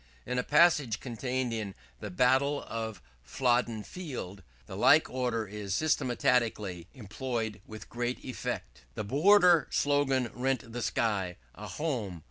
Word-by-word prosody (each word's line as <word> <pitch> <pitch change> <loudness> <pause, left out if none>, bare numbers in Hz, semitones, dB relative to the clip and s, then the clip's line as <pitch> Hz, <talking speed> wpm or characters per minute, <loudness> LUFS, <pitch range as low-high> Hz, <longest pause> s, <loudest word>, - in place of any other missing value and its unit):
In 125 - -1
a - - 0
passage 150 -10 +4
contained 125 0 -3
in 105 -4 -4 0.2
'The 105 - -6
Battle 130 +8 +2
of 110 -1 -5 0.2
Flodden 120 - 0
Field,' 125 - -7 0.2
the - - -9
like - - +5
order 125 -3 -1
is 100 -1 -4
systematically 120 - 0
employed 115 -2 -4
with 110 -1 -10
great 120 +1 -4
effect: 65 - -5
"The - - -3
Border 175 - +5
slogan 135 -4 +1
rent 125 -2 -2
the 120 - -4
sky! 100 -7 -1 0.2
_A - - -8
Home! 120 - -3
120 Hz, 130 wpm, -30 LUFS, 105-130 Hz, 0.2 s, like